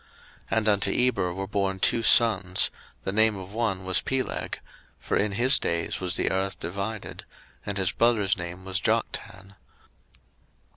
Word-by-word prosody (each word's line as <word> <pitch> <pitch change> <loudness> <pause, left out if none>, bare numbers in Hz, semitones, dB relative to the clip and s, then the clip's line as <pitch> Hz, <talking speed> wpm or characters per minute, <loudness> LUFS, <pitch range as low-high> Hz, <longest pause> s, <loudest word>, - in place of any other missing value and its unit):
01:010:025 - - 0
And 110 -1 +1
unto 100 -1 +3
Eber 125 -8 +1
were 95 0 -3
born 100 -1 -1
two 115 - +2
sons: 105 -5 +3 0.3
the - - -2
name 110 +1 +3
of 95 +1 -9
one 100 -5 -1
was 95 0 +3
Peleg; 135 -1 -3 0.4
for - - -3
in 100 0 +1
his 125 +6 +4
days 85 0 -2
was 90 -1 -1
the - - 0
earth 95 0 -2
divided; 100 +5 -5 0.4
and 100 0 -2
his 95 -2 +2
brother's 110 -5 +2
name 90 +1 -7
was 95 0 -1
Joktan. 95 +2 -2
100 Hz, 155 wpm, -26 LUFS, 95-110 Hz, 0.4 s, his